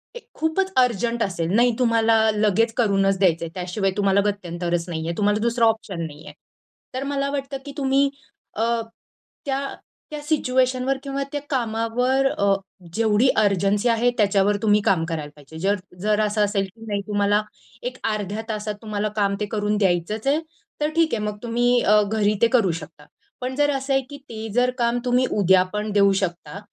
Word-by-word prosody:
ए -, -, -6 dB, 0.2 s
खूपच 375 Hz, +5 st, 0 dB
अर्जंट 235 Hz, -1 st, +2 dB
असेल, 170 Hz, -3 st, -2 dB
नाही 240 Hz, +1 st, +5 dB
तुम्हाला 230 Hz, -2 st, +3 dB, 0.2 s
लगेच 215 Hz, +2 st, +2 dB
करूनच 195 Hz, -4 st, +2 dB
द्यायचंय, 170 Hz, -3 st, +2 dB
त्याशिवाय 185 Hz, +2 st, -2 dB
तुम्हाला 200 Hz, 0 st, +3 dB
गत्यंतरच 175 Hz, -3 st, -2 dB
नाहीये, 165 Hz, 0 st, -3 dB
तुम्हाला 210 Hz, 0 st, +2 dB
दुसरा 235 Hz, 0 st, +2 dB
ऑप्शन 220 Hz, -6 st, -1 dB
नाहीये, 150 Hz, 0 st, -10 dB, 0.6 s
तर 260 Hz, +1 st, -3 dB
मला 275 Hz, 0 st, -1 dB
वाटतं 275 Hz, -1 st, -3 dB
की 285 Hz, -, -7 dB
तुम्ही 275 Hz, 0 st, +2 dB, 0.5 s
अ, 220 Hz, -, 0 dB, 0.8 s
त्या 270 Hz, -1 st, -1 dB, 0.5 s
त्या 300 Hz, -1 st, -5 dB
सिच्युएशनवर 260 Hz, -3 st, +1 dB
किंवा 275 Hz, 0 st, -3 dB
त्या 290 Hz, -1 st, -3 dB
कामावर 245 Hz, +2 st, 0 dB
अ, 200 Hz, 0 st, +3 dB, 0.4 s
जेवढी 225 Hz, +3 st, +3 dB
अर्जन्सी 200 Hz, +3 st, +2 dB
आहे 230 Hz, +2 st, +3 dB
त्याच्यावर 205 Hz, -1 st, +3 dB
तुम्ही 210 Hz, -1 st, +3 dB
काम 165 Hz, -4 st, +2 dB
करायला 150 Hz, -3 st, -4 dB
पाहिजे. 150 Hz, +2 st, -13 dB
जर 200 Hz, +3 st, +2 dB, 0.3 s
जर 210 Hz, 0 st, +1 dB
असं 210 Hz, 0 st, 0 dB
असेल 200 Hz, -1 st, 0 dB
की 225 Hz, +4 st, -14 dB
नाही 200 Hz, -1 st, -1 dB
तुम्हाला 205 Hz, 0 st, +2 dB, 0.5 s
एक -, -, -16 dB
अर्ध्या 210 Hz, +1 st, -3 dB
तासात 210 Hz, -1 st, -3 dB
तुम्हाला 215 Hz, -1 st, -2 dB
काम 200 Hz, -1 st, +1 dB
ते 210 Hz, -, -1 dB
करून 210 Hz, 0 st, 0 dB
द्यायचंच 195 Hz, +5 st, 0 dB
आहे 295 Hz, +3 st, +3 dB, 0.4 s
तर 300 Hz, -, +2 dB
ठीक 330 Hz, -1 st, +2 dB
आहे, 215 Hz, -2 st, -1 dB
मग 210 Hz, 0 st, -3 dB
तुम्ही 240 Hz, +1 st, +2 dB
अ, 210 Hz, +1 st, +5 dB
घरी 210 Hz, 0 st, +1 dB
ते 235 Hz, -, +6 dB
करू 195 Hz, -6 st, +2 dB
शकता. 150 Hz, -1 st, -13 dB, 0.4 s
पण 255 Hz, +1 st, -3 dB
जर 290 Hz, 0 st, +2 dB
असं 270 Hz, 0 st, -2 dB
आहे 270 Hz, -, +3 dB
की 285 Hz, -, -8 dB
ते 220 Hz, -1 st, -6 dB
जर 250 Hz, +2 st, +3 dB
काम 235 Hz, 0 st, +1 dB
तुम्ही 250 Hz, +1 st, +3 dB
उद्या 190 Hz, -1 st, +5 dB
पण 210 Hz, 0 st, -2 dB
देऊ 200 Hz, -1 st, +4 dB
शकता, 175 Hz, 0 st, -4 dB
215 Hz, 175 wpm, -23 LUFS, 195-245 Hz, 0.8 s, ते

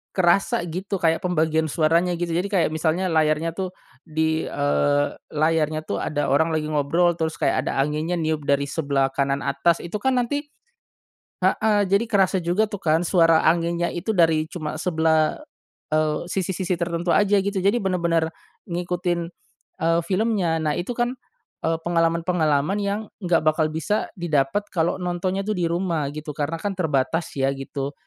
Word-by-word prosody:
kerasa 175 Hz, -1 st, +2 dB
gitu 190 Hz, +4 st, -4 dB
kayak 165 Hz, +1 st, +1 dB
pembagian 160 Hz, -3 st, +1 dB
suaranya 170 Hz, +3 st, +2 dB
gitu, 175 Hz, -1 st, -2 dB
jadi 180 Hz, +3 st, 0 dB
kayak 185 Hz, -4 st, +2 dB
misalnya 160 Hz, +4 st, 0 dB
layarnya 155 Hz, +1 st, +1 dB
tuh 185 Hz, -1 st, -3 dB, 0.3 s
di 160 Hz, 0 st, 0 dB
eee, 145 Hz, 0 st, +1 dB, 0.2 s
layarnya 155 Hz, 0 st, +1 dB
tuh -, -, -2 dB
ada 145 Hz, -1 st, -1 dB
orang 160 Hz, +4 st, +3 dB
lagi 155 Hz, -1 st, -1 dB
ngobrol 160 Hz, +4 st, +2 dB
terus 160 Hz, -1 st, -2 dB
kayak 130 Hz, -, +1 dB
ada -, -, -1 dB
anginya 155 Hz, +5 st, -1 dB
niup 155 Hz, -2 st, -1 dB
dari 140 Hz, 0 st, +1 dB
sebelah 140 Hz, -2 st, 0 dB
kanan 140 Hz, 0 st, 0 dB
atas 165 Hz, +5 st, +2 dB
itu 170 Hz, +4 st, -7 dB
kan 265 Hz, -1 st, +2 dB
nanti 285 Hz, +5 st, -2 dB, 1.0 s
heeh 215 Hz, -1 st, +3 dB
jadi 200 Hz, +3 st, +3 dB
kerasa 195 Hz, -2 st, +3 dB
juga 180 Hz, +6 st, +1 dB
tuh 205 Hz, -2 st, -7 dB
kan 160 Hz, 0 st, +2 dB
suara 165 Hz, -3 st, +4 dB
anginnya 170 Hz, +1 st, +1 dB
itu 175 Hz, +5 st, -3 dB
dari 160 Hz, -2 st, +3 dB
cuma 155 Hz, -4 st, -5 dB
sebelah, 160 Hz, -2 st, +1 dB, 0.5 s
eee, 155 Hz, +1 st, +1 dB
sisi-sisi 185 Hz, 0 st, -1 dB
tertentu 170 Hz, 0 st, -2 dB
aja 205 Hz, 0 st, +4 dB
gitu 200 Hz, 0 st, -1 dB
jadi 200 Hz, +5 st, +3 dB
bener-bener 170 Hz, -4 st, +1 dB, 0.4 s
ngikutin, 175 Hz, -1 st, -2 dB, 0.5 s
eee, 165 Hz, +1 st, +2 dB
filmnya. 190 Hz, -5 st, +1 dB
Nah 150 Hz, -1 st, 0 dB
itu 190 Hz, +8 st, -3 dB
kan, 240 Hz, +1 st, 0 dB, 0.5 s
eee, 165 Hz, 0 st, +1 dB
pengalaman-pengalaman 165 Hz, 0 st, +1 dB
yang 200 Hz, +2 st, -2 dB, 0.2 s
nggak 175 Hz, -3 st, +2 dB
bakal 155 Hz, 0 st, +2 dB
bisa 160 Hz, +7 st, -1 dB
didapet 170 Hz, +3 st, 0 dB
kalau 170 Hz, +1 st, +1 dB
nontonnya 185 Hz, +2 st, -2 dB
tuh 215 Hz, -, 0 dB
di 175 Hz, -3 st, -1 dB
rumah 170 Hz, -5 st, -1 dB
gitu 150 Hz, -1 st, -6 dB
karena 150 Hz, +3 st, -2 dB
kan 200 Hz, +1 st, -2 dB
terbatas 160 Hz, 0 st, 0 dB
ya 135 Hz, 0 st, +2 dB
gitu, 135 Hz, +1 st, -5 dB
165 Hz, 160 wpm, -23 LUFS, 155-180 Hz, 1.0 s, suara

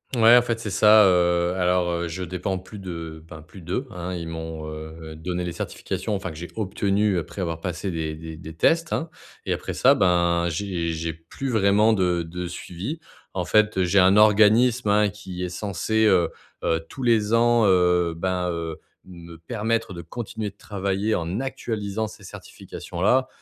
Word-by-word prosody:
Ouais 115 Hz, +1 st, +7 dB
en -, -, +6 dB
fait 115 Hz, -2 st, -2 dB
c'est 110 Hz, -, -5 dB
ça, 105 Hz, +2 st, +6 dB
heu, 85 Hz, -1 st, +2 dB
alors, 90 Hz, -1 st, +2 dB
heu, 85 Hz, 0 st, -2 dB
je 90 Hz, +3 st, -5 dB
dépends 90 Hz, +2 st, -3 dB
plus 105 Hz, +3 st, -11 dB
de, 85 Hz, -4 st, -7 dB
ben, 80 Hz, -, -10 dB
plus 80 Hz, +5 st, -14 dB
d'eux 95 Hz, +11 st, -3 dB
hein, 90 Hz, +1 st, -5 dB
ils 85 Hz, -2 st, -5 dB
m'ont, 80 Hz, -1 st, -6 dB
heu, 80 Hz, +1 st, -9 dB
donné 90 Hz, +2 st, -4 dB
les 90 Hz, -, -3 dB
certifications 85 Hz, +4 st, -4 dB
enfin 95 Hz, -1 st, -4 dB
que 80 Hz, -, -9 dB
j'ai 85 Hz, -, -6 dB
obtenu 100 Hz, -1 st, 0 dB
après 85 Hz, +4 st, -5 dB
avoir 85 Hz, -2 st, -3 dB
passé 90 Hz, +2 st, -4 dB
des 80 Hz, -2 st, -3 dB
des 80 Hz, 0 st, -9 dB
des 80 Hz, -1 st, -9 dB
tests 165 Hz, -, +2 dB
hein, 160 Hz, 0 st, -2 dB, 0.4 s
et -, -, 0 dB
après -, -, -3 dB
ça, -, -, +5 dB
bah, 85 Hz, -2 st, +2 dB
j'ai 85 Hz, -1 st, -2 dB
j'ai 80 Hz, +1 st, -3 dB
plus 80 Hz, -, -7 dB
vraiment 105 Hz, 0 st, +4 dB
de 90 Hz, -3 st, +1 dB
de 90 Hz, +2 st, -6 dB
suivi. 90 Hz, -, -6 dB, 0.3 s
En 90 Hz, -2 st, -1 dB
fait, 105 Hz, +2 st, +3 dB
heu, -, -, +3 dB
j'ai 95 Hz, +2 st, +3 dB
un 95 Hz, +2 st, +5 dB
organisme 110 Hz, +3 st, +5 dB
hein, 105 Hz, 0 st, +4 dB
qui 95 Hz, -3 st, -7 dB
est 90 Hz, -, -2 dB
censé, 110 Hz, +3 st, -1 dB
heu 90 Hz, -5 st, +4 dB, 0.3 s
heu, 80 Hz, -, +1 dB
tous 135 Hz, -, -8 dB
les 115 Hz, -3 st, +2 dB
ans, 115 Hz, -1 st, +4 dB
heu, 90 Hz, -2 st, +3 dB
ben, 90 Hz, 0 st, -1 dB
heu, 85 Hz, -2 st, -4 dB, 0.3 s
me 85 Hz, -2 st, -12 dB
permettre 115 Hz, +5 st, -2 dB
de 85 Hz, -, -7 dB
continuer 110 Hz, -3 st, -5 dB
de 100 Hz, -, -35 dB
travailler 100 Hz, +1 st, -1 dB
en 85 Hz, +5 st, -2 dB
actualisant 110 Hz, -5 st, -3 dB
ces -, -, -13 dB
certifications-là 120 Hz, +9 st, -2 dB
95 Hz, 185 wpm, -24 LUFS, 85-105 Hz, 0.4 s, Ouais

